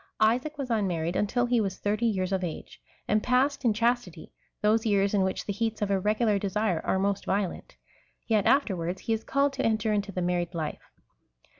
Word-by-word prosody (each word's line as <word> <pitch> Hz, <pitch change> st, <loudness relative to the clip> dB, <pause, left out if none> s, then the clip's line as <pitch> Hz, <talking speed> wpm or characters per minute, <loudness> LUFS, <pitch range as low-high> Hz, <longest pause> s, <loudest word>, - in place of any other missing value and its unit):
Isaac 250 Hz, +8 st, +2 dB
was 270 Hz, -4 st, -4 dB
unmarried 180 Hz, -6 st, 0 dB
until 245 Hz, +4 st, +1 dB
he 240 Hz, -1 st, +2 dB
was 195 Hz, -3 st, -2 dB
thirty 215 Hz, +3 st, 0 dB
years 190 Hz, -4 st, -1 dB
of 190 Hz, -1 st, 0 dB
age, 170 Hz, -3 st, -6 dB, 0.3 s
and 215 Hz, 0 st, +2 dB
passed 260 Hz, +4 st, +1 dB
in 235 Hz, -, +4 dB
chastity 230 Hz, -6 st, -1 dB, 0.3 s
those 220 Hz, +1 st, +3 dB
years 200 Hz, -3 st, +2 dB
in 200 Hz, -, +3 dB
which 190 Hz, 0 st, -1 dB
the 205 Hz, -, -2 dB
heats 225 Hz, +1 st, -2 dB
of 205 Hz, -1 st, -1 dB
irregular 210 Hz, +2 st, +2 dB
desire 200 Hz, -2 st, 0 dB
are -, -, +1 dB
most 200 Hz, +1 st, 0 dB
violent; 195 Hz, -2 st, -2 dB, 0.5 s
yet 215 Hz, -3 st, +2 dB
afterwards 190 Hz, -9 st, +1 dB
he 225 Hz, -, -1 dB
is 225 Hz, 0 st, -2 dB
called 280 Hz, 0 st, +1 dB
to 270 Hz, 0 st, -2 dB
enter 220 Hz, -1 st, +1 dB
into 205 Hz, -1 st, -1 dB
the 180 Hz, -1 st, -2 dB
married 175 Hz, 0 st, -1 dB
life. 160 Hz, -2 st, -5 dB
210 Hz, 190 wpm, -27 LUFS, 190-230 Hz, 0.5 s, in